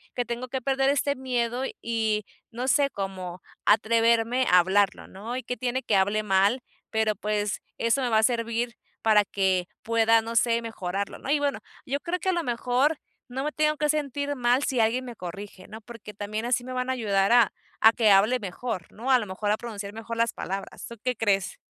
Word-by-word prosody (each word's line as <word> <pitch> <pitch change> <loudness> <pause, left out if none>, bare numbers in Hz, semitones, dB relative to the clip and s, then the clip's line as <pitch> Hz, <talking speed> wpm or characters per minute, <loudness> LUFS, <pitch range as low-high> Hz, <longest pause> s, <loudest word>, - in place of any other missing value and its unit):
que 245 - -1
tengo 240 +2 -4
que 265 +1 -3
perder 270 +1 +1
este 285 0 +1
miedo, 250 -1 -1 0.2
y 220 -2 0 0.3
no 245 +2 -4
sé, 280 +1 +3
cómo 185 -2 -5 0.2
atreverme 230 +3 +3
a 180 - +8
hablarlo, 195 +2 +1
¿no? 215 +6 -7
Y 255 - -4
¿qué 250 +1 -4
tiene 255 +1 -2
que 220 - +1
hable 200 +3 +2
mal', 200 +5 +2 0.3
pero 220 -1 +1
pues 210 0 -2 0.2
eso 230 +4 +1
me 255 - 0
va 220 -1 +4
a - - +2
servir 235 0 0 0.3
para 215 -2 +5
que 190 -3 0 0.2
pueda, 225 0 +4
no 230 +1 -6
sé, 230 0 +3
mejorarlo, 200 -3 -4
¿no? - - -7
Y 295 - +4
bueno, 285 -1 -1 0.3
yo 275 +2 -2
creo 350 +4 -3
que 380 - -1
a - - +4
lo 345 -2 -1
mejor 250 +4 +1 0.3
no 260 +2 -4
me 300 - -1
tengo 305 0 +1
que 300 0 0
sentir 285 -1 -1
mal 245 +2 +2
si 260 -4 0
alguien 230 +3 +2
me 240 -2 -8
corrige, 185 +1 -8
¿no?, 220 +2 -10
porque 230 -1 -11
también 210 +2 -4
así 245 0 +1
me 255 +1 -6
van 255 0 -2
a - - +2
ayudar 200 -5 +1
a 240 -3 +5 0.3
a 225 - +8
que 225 -3 +3
hable 210 +6 +5
mejor, 195 -2 -5
¿no? 245 +5 -3
A 255 - +6
lo 220 - -4
mejor 205 +2 -2
a 210 - +2
pronunciar 205 -4 -7
mejor 225 +1 -6
las 230 0 +1
palabras, 195 +1 -6
¿tú 235 - -9
qué 250 -1 0
crees? 195 -4 0
230 Hz, 215 wpm, -26 LUFS, 205-255 Hz, 0.3 s, a